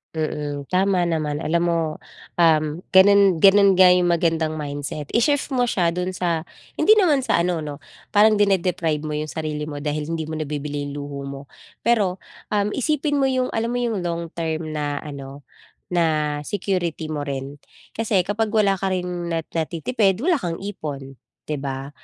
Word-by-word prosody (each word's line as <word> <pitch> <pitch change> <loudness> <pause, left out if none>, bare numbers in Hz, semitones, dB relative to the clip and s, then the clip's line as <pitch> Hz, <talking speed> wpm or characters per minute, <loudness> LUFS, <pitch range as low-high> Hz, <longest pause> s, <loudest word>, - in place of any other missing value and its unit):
Mm. 150 -2 -3
Tama 185 -2 +2
naman. 155 -2 -1
Alam 170 +2 +1
mo, 170 -1 +1 0.6
um, 160 -2 +4 0.3
gano'n 195 -2 +6
gano'n 200 0 +7
nga 185 0 +7
'yong 180 0 +4
magandang 165 -2 +1
mindset. 145 -1 -5
I-shift 285 +5 +1
mo 250 -2 +1
siya 180 -7 +1
do'n 180 +2 -3
sa 170 -3 -1 0.3
hindi 435 - +6
naman 315 -11 +3
sa 220 -8 +2
ano 175 0 0
'no, 145 0 -7 0.3
parang 215 0 +5
dine-deprive 180 -6 +1
mo 150 -1 -3
'yong 155 0 -4
sarili 150 -1 -3
mo 145 -1 -6
dahil 150 0 -2
hindi 160 -1 -3
mo 160 - -4
nabibili 145 -1 -4
'yong 140 - -6
luho 145 -1 -6
mo, 140 0 -7 0.4
pero, 205 -6 +1 0.3
um, 205 0 +1
isipin 290 +2 0
mo 275 - +2
'yong 260 -1 +1
alam 230 +2 -2
mo 245 - 0
'yong 215 -7 -1
long 170 -1 -3
term 160 -1 -2
na 145 -2 -3
ano, 140 -1 -9 0.5
na 155 -4 +1
security 175 -5 -2
mo 145 -2 -3
rin. 140 0 -5 0.4
Kasi 220 -4 +2
kapag 210 +4 -2
wala 200 -3 +3
ka 190 0 -1
ring 180 -1 -2 0.2
na 165 - 0
natitipid 190 - 0
wala 340 +2 +2
kang 175 -6 -4
ipon, 140 -9 -6 0.3
'di 150 - -1
ba? 135 0 -5
170 Hz, 170 wpm, -22 LUFS, 150-200 Hz, 0.6 s, gano'n